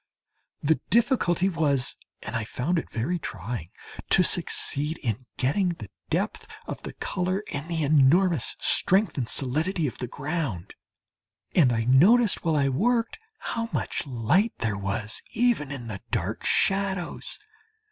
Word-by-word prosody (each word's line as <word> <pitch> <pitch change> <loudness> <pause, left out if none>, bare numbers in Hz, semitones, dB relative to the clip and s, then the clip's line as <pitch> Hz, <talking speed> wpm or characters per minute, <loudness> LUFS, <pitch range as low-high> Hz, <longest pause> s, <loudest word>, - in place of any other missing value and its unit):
The 160 +2 +2
difficulty 220 -7 +2
was 150 -8 +1 0.3
and - - -5
I 115 - -1
found 130 +10 -1
it - - -8
very 140 +11 -2
trying 100 - -6 0.4
to - - +6
succeed 150 +3 +1
in 120 +1 -3
getting 150 +9 +1
the 105 - -10 0.2
depth - - -2 0.2
of - - -6
the - - -7
colour 185 +2 -2
and 145 +2 -4
the 165 -2 -1
enormous 155 +2 +3
strength 190 -2 +3
and 120 - -2
solidity 155 +6 +1
of 130 - -4
the 125 - -3
ground 140 - -4 0.8
and 140 -8 +5
I 115 -1 0
noticed 185 - +4
while 165 -3 +1
I 140 -2 +2
worked 230 - 0 0.2
how 230 -1 -4
much - - -2
light 140 - +1
there 110 -3 -1
was 100 +2 -2
even 225 - +1
in 130 -4 -6
the 105 -4 -6
dark 110 -2 -2
shadows! 195 -2 0
150 Hz, 145 wpm, -26 LUFS, 120-185 Hz, 0.8 s, to